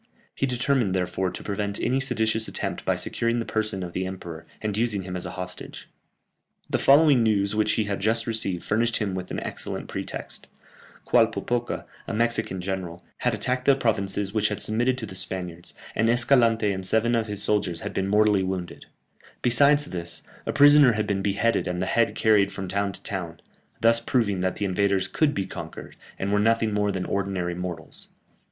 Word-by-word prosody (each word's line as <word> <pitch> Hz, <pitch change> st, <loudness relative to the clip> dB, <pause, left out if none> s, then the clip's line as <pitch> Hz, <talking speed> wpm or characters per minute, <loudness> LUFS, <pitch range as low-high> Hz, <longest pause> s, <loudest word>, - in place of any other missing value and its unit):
He 135 Hz, -, -1 dB
determined, 125 Hz, -5 st, +1 dB
therefore, 90 Hz, 0 st, -1 dB
to 90 Hz, -, -8 dB
prevent 100 Hz, 0 st, -3 dB
any 130 Hz, +2 st, +1 dB
seditious 110 Hz, -4 st, +1 dB
attempt -, -, -4 dB
by -, -, +2 dB
securing 115 Hz, +1 st, -1 dB
the 115 Hz, -, -2 dB
person 110 Hz, -4 st, -2 dB
of 85 Hz, -1 st, -7 dB
the 95 Hz, 0 st, -2 dB
emperor, 85 Hz, -4 st, -8 dB
and 105 Hz, -2 st, -3 dB
using 105 Hz, -3 st, 0 dB
him 90 Hz, 0 st, -6 dB
as 90 Hz, -, -1 dB
a -, -, -8 dB
hostage. 90 Hz, 0 st, -5 dB, 0.8 s
The -, -, 0 dB
following 140 Hz, -2 st, +6 dB
news 100 Hz, -3 st, +2 dB
which 110 Hz, 0 st, +2 dB
he 110 Hz, -, +1 dB
had 100 Hz, -1 st, -3 dB
just 110 Hz, +3 st, +1 dB
received 105 Hz, -6 st, +1 dB
furnished 115 Hz, +2 st, +1 dB
him 100 Hz, -4 st, -2 dB
with 90 Hz, -1 st, -5 dB
an -, -, -3 dB
excellent -, -, -5 dB
pretext: -, -, -6 dB, 0.6 s
Qualpopoca, 120 Hz, +1 st, +1 dB, 0.2 s
a 115 Hz, -, -3 dB
Mexican 115 Hz, -5 st, 0 dB
general, 90 Hz, -2 st, -5 dB
had 125 Hz, -2 st, 0 dB
attacked 125 Hz, +4 st, -1 dB
the 140 Hz, -, +6 dB
provinces 100 Hz, -5 st, -1 dB
which 105 Hz, -1 st, +2 dB
had 105 Hz, -, -3 dB
submitted 120 Hz, +4 st, +1 dB
to 120 Hz, -, -4 dB
the 95 Hz, -, -9 dB
Spaniards, 90 Hz, -2 st, -4 dB, 0.2 s
and 115 Hz, +1 st, +1 dB
Escalante 115 Hz, -3 st, +3 dB
and 95 Hz, -1 st, -4 dB
seven 110 Hz, +5 st, +2 dB
of 115 Hz, -1 st, +1 dB
his 105 Hz, -1 st, -1 dB
soldiers 100 Hz, -5 st, 0 dB
had -, -, -5 dB
been 95 Hz, -, -1 dB
mortally 105 Hz, -1 st, +3 dB
wounded; 95 Hz, -2 st, -4 dB, 0.6 s
besides 145 Hz, +4 st, +4 dB
this, 85 Hz, -6 st, -6 dB, 0.2 s
a -, -, +1 dB
prisoner 145 Hz, -3 st, +7 dB
had 105 Hz, 0 st, -1 dB
been 100 Hz, -2 st, -1 dB
beheaded 105 Hz, +4 st, +1 dB
and 90 Hz, 0 st, -2 dB
the 90 Hz, -, 0 dB
head 115 Hz, +4 st, +1 dB
carried 105 Hz, -3 st, +3 dB
from 95 Hz, -1 st, -5 dB
town 100 Hz, +2 st, -1 dB
to -, -, -9 dB
town, 85 Hz, -4 st, -4 dB, 0.4 s
thus 115 Hz, 0 st, +5 dB
proving 115 Hz, -5 st, 0 dB
that 95 Hz, 0 st, -1 dB
the 105 Hz, -, -2 dB
invaders 95 Hz, 0 st, +1 dB
could 145 Hz, +7 st, +1 dB
be 95 Hz, -, -1 dB
conquered, -, -, -9 dB, 0.2 s
and 100 Hz, +1 st, -2 dB
were 105 Hz, -, +3 dB
nothing 110 Hz, 0 st, +2 dB
more 105 Hz, 0 st, +1 dB
than 95 Hz, -1 st, -3 dB
ordinary 95 Hz, -3 st, -2 dB
mortals. 85 Hz, -2 st, -7 dB
105 Hz, 190 wpm, -25 LUFS, 95-115 Hz, 0.8 s, prisoner